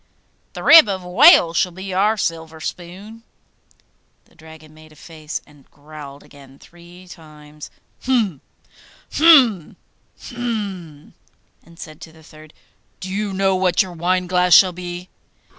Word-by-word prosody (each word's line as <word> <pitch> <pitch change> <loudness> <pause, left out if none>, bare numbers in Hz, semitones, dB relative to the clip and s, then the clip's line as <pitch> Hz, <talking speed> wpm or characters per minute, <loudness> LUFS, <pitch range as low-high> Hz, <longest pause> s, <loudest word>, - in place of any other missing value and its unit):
'The - - -9
rib 325 -10 +7
of 190 -2 -5
a - - -12
whale 180 - +5
shall 180 +2 -1
be 190 +2 -9
our 210 +4 0
silver 160 -3 -5
spoon.' 185 +8 -9 1.0
The - - -29
Dragon 160 -1 -17
made 155 0 -18
a - - -20
face, 155 -1 -9
and 145 -2 -23
growled 145 -1 -13
again 140 -2 -18
three 175 +3 -18
times, 150 -3 -14 0.4
'Hum, 220 - -1 0.7
hum, 255 - +3 0.4
hum,' 200 - -7 0.5
and 170 0 -21
said 155 -1 -12
to 160 - -12
the 160 0 -20
third, 155 -1 -17 0.5
'Do 185 - -8
you 205 +1 -4
know 190 0 0
what 185 +2 +1
your 185 -2 -11
wineglass 180 +1 +1
shall 185 -2 +5
be? 175 0 -9
175 Hz, 140 wpm, -18 LUFS, 155-195 Hz, 1.0 s, rib